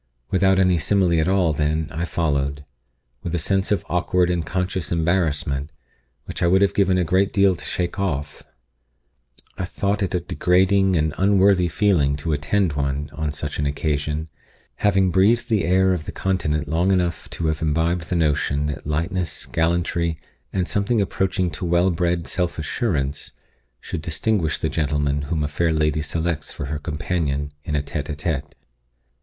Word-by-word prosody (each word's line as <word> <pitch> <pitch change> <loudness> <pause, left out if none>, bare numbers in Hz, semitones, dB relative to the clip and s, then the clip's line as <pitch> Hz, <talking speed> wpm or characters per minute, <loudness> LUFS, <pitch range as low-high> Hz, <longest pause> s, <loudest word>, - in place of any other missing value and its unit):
Without 95 0 +3
any 90 -2 +3
simile 90 -1 +2
at 80 - +1
all, 95 -4 +2
then, 75 +1 0
I 80 +2 -2
followed, 70 -4 -1 0.6
with 85 0 -3
a - - +1
sense 95 +4 0
of 105 - +1
awkward 90 0 +1
and 85 -2 0
conscious 90 0 -2
embarrassment, 80 -4 0 0.5
which - - -6
I 85 - +3
would 95 +3 +4
have 100 - +2
given 95 -2 +3
a 90 - +2
great 95 +4 +2
deal 100 -2 +4
to - - -8
shake 90 +2 -2
off. 75 -7 -2 1.2
I 95 - -1
thought 100 +3 -1
it 95 -2 -1
a - - +2
degrading 95 +2 +2
and 80 -1 +1
unworthy 95 -2 +4
feeling 80 -6 +2
to 75 +2 -2
attend 80 +4 +1
one 70 +1 -2
on 80 -2 -2
such 75 0 -5
an 75 - +1
occasion, 75 +1 -2 0.5
having 95 -2 +2
breathed 105 +8 +3
the 105 -7 +2
air 95 +2 +3
of 85 -3 -3
the - - -5
Continent 75 -6 -1
long 85 +6 +1
enough 90 -3 0
to 85 - -2
have 80 -1 0
imbibed 80 +2 0
the 90 - 0
notion 75 -3 +1
that 75 -1 -4
lightness, 85 +3 -2
gallantry, 85 0 0 0.3
and 90 -2 -1
something 105 +3 +1
approaching 95 -2 0
to 75 - -7
well 85 +2 +3
bred 85 0 0
self 90 -1 -2
assurance, 75 - -2 0.5
should 85 - -5
distinguish 85 +1 0
the - - -1
gentleman 75 -2 0
whom 80 -3 0
a - - 0
fair 80 +3 0
lady 75 -1 +1
selects 80 -1 -2
for - - -5
her 75 +1 -3
companion 75 -2 -2
in 75 -3 -3
a 75 - 0
_tete 75 0 -5
a 75 - -2
tete. 75 -2 -3
85 Hz, 170 wpm, -22 LUFS, 75-95 Hz, 1.2 s, would